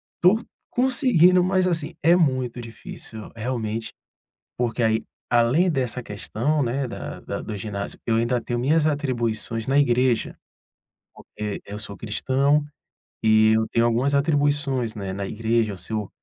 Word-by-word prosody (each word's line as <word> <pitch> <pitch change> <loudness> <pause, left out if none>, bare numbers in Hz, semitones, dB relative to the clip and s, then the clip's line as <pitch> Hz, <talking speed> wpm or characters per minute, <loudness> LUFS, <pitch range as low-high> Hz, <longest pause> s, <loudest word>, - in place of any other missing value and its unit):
estou 190 +6 +4 0.3
conseguindo, 235 - +4
mas 185 0 +2
assim, 170 -1 -1
é 170 +2 +5
muito 130 -7 +1
difícil, 115 -1 -9
realmente. 115 -1 -3 0.7
Porque 120 0 -1
aí, 110 -1 +2 0.3
além 120 +10 +3
dessa 130 -5 -1
questão, 120 +7 -1
né, 130 +2 -1
da - - -7
da - - -5
do 105 - -6
ginásio, 100 0 -5
eu 115 - +2
ainda 120 +1 +1
tenho 120 +1 -3
minhas 150 +5 +2
atribuições 120 -6 -2
na 135 +1 +2
igreja. 125 -3 +2 0.8
Porque 105 -1 -6
eu 100 - -7
sou 100 -1 -6
cristão, 135 +6 +1 0.6
e 110 0 +5
eu 110 0 +1
tenho 115 0 +2
algumas 125 +5 +2
atribuições, 145 -5 +1
né, 100 -2 -4
na 100 +1 -4
igreja, 115 -1 0
eu 95 - -9
seu 105 +3 -4
120 Hz, 145 wpm, -24 LUFS, 110-145 Hz, 0.8 s, é